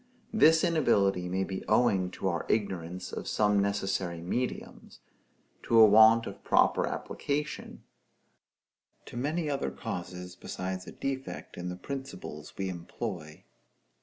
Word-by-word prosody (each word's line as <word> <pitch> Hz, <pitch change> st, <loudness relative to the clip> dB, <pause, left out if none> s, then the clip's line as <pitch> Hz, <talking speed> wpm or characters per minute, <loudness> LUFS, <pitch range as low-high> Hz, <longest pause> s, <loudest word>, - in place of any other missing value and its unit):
This 160 Hz, -7 st, +6 dB
inability 100 Hz, -, +2 dB
may 95 Hz, +2 st, 0 dB
be 95 Hz, -1 st, -5 dB
owing 100 Hz, -7 st, +3 dB
to -, -, -3 dB
our 85 Hz, -3 st, -2 dB
ignorance 90 Hz, -4 st, -2 dB
of -, -, -5 dB
some 105 Hz, -1 st, +2 dB
necessary 95 Hz, -3 st, -1 dB
mediums; 120 Hz, +9 st, -4 dB, 0.6 s
to 115 Hz, -, +3 dB
a 110 Hz, -, +11 dB
want 110 Hz, +2 st, +7 dB
of -, -, -8 dB
proper -, -, +3 dB
application; 150 Hz, +1 st, -4 dB, 1.2 s
to -, -, -11 dB
many 150 Hz, +6 st, -1 dB
other 140 Hz, -, -1 dB
causes 90 Hz, +6 st, -6 dB
besides 95 Hz, 0 st, -5 dB
a -, -, -7 dB
defect 135 Hz, -1 st, -5 dB
in 90 Hz, 0 st, -5 dB
the 90 Hz, -, -4 dB
principles 90 Hz, -, -7 dB
we 95 Hz, -, -2 dB
employ. 85 Hz, -2 st, -6 dB
100 Hz, 130 wpm, -29 LUFS, 90-125 Hz, 1.2 s, a